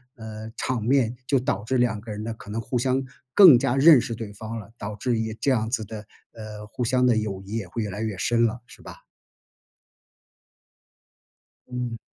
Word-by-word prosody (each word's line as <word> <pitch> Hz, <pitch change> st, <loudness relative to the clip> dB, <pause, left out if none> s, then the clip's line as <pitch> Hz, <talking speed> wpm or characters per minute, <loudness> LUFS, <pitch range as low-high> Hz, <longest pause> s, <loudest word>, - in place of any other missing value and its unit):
呃， 110 Hz, -1 st, -8 dB
场 125 Hz, -4 st, -2 dB
面 125 Hz, -1 st, +2 dB
就 135 Hz, -, +3 dB
导 105 Hz, -5 st, -2 dB
致 130 Hz, +4 st, 0 dB
两 120 Hz, -3 st, +1 dB
个 110 Hz, 0 st, -8 dB
人 105 Hz, 0 st, -5 dB
呢 115 Hz, +1 st, -4 dB
可 110 Hz, -, -13 dB
能 110 Hz, +2 st, -3 dB
互 125 Hz, +3 st, -2 dB
相 130 Hz, +2 st, +1 dB, 0.3 s
更 175 Hz, -9 st, +9 dB
加 130 Hz, -1 st, 0 dB
认 145 Hz, +1 st, +8 dB
识 120 Hz, -1 st, -4 dB
对 110 Hz, -2 st, -7 dB
方 110 Hz, +3 st, -7 dB
了， 105 Hz, 0 st, -12 dB
导 105 Hz, +1 st, -6 dB
致 115 Hz, +2 st, -1 dB
也 110 Hz, 0 st, -2 dB
这 135 Hz, +5 st, 0 dB
样 110 Hz, -3 st, +1 dB
子 115 Hz, -3 st, -2 dB
的， 110 Hz, +1 st, -7 dB, 0.3 s
呃， 105 Hz, -1 st, -9 dB
互 125 Hz, -, -4 dB
相 125 Hz, +1 st, +2 dB
的 120 Hz, -3 st, +4 dB
友 100 Hz, -3 st, -3 dB
谊 105 Hz, -, -6 dB
也 100 Hz, -5 st, -4 dB
会 115 Hz, +6 st, -4 dB
越 105 Hz, -, -4 dB
来 105 Hz, +3 st, -5 dB
越 110 Hz, -4 st, -3 dB
深 115 Hz, +4 st, +2 dB
了 115 Hz, +2 st, -2 dB
是 -, -, -16 dB
吧？ -, -, -11 dB, 2.7 s
嗯。 125 Hz, -2 st, -4 dB
115 Hz, 220 characters per minute, -25 LUFS, 110-125 Hz, 2.7 s, 更